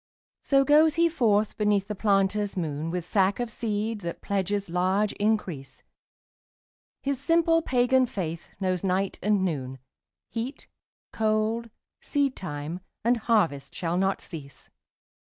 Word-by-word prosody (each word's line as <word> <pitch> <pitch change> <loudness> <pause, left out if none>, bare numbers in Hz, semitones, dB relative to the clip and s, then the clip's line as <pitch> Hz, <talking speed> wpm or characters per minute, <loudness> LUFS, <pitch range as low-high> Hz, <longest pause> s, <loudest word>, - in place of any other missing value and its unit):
So 275 -1 +3
goes 305 +2 +5
he 335 0 +4
forth 220 -9 +1
beneath 210 -2 +2
the 210 - -3
planter's 200 0 +1
moon 155 -2 -2
With 175 0 -3
sack 195 +2 +2
of 240 -1 -2
seed 215 -1 -2
that 170 -2 -5
pledges 200 0 -1
large 185 +4 +1
increase, 200 -10 -2 1.2
His 275 -1 -1
simple 330 +2 +3
pagan 255 -2 +3
faith 170 -6 -4
knows 185 -2 -1
night 190 +1 0
and 205 -2 +2
noon, 135 -6 -3 0.5
Heat, 240 +4 -5 0.5
cold, 220 +1 0 0.3
seedtime 180 - -2 0.3
and 240 +1 +4
harvest 175 - +1
shall 170 -1 -1
not 190 +1 +1
cease. 140 -5 -10
205 Hz, 125 wpm, -27 LUFS, 180-235 Hz, 1.2 s, goes